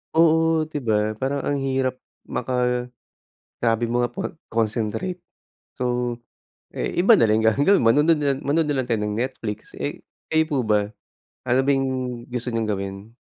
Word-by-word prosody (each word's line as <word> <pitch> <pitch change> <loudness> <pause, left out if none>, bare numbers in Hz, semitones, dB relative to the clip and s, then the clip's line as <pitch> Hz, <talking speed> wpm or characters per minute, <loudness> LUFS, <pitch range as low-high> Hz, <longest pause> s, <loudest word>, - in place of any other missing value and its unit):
Oo, 160 -1 +4
'di 150 -3 -5
ba 110 -1 +1
,parang 135 +5 -1
ang 145 - +1
hirap 135 -2 0 0.3
maka 125 0 0 0.7
sabi 115 0 +1
mo 120 0 +2
nga, - - -7
pag 195 - -4
concentrate. 115 - -1 0.6
So, 125 -1 -1 0.5
eh, - - -2
iba 195 +7 +6
na 115 - +5
lang 110 +1 +3
gagawin, 145 - +4
manonood 150 +8 +4
na 145 -2 +1
lang 135 - -7
manood 155 +3 +1
na 145 -1 -1
lang 125 - -7
tayo 115 - +2
ng 105 - -2
Netflix, 115 -5 -5
eh, - - -4 0.3
kayo 160 0 +5
po 145 - 0
ba? 105 -1 +2 0.5
Ano 125 +1 +2
ba 135 - +1
yung 130 -3 -2
gusto 125 0 -3
niyong 115 -2 -1
gawin? 100 +3 -5
125 Hz, 165 wpm, -23 LUFS, 115-145 Hz, 0.7 s, iba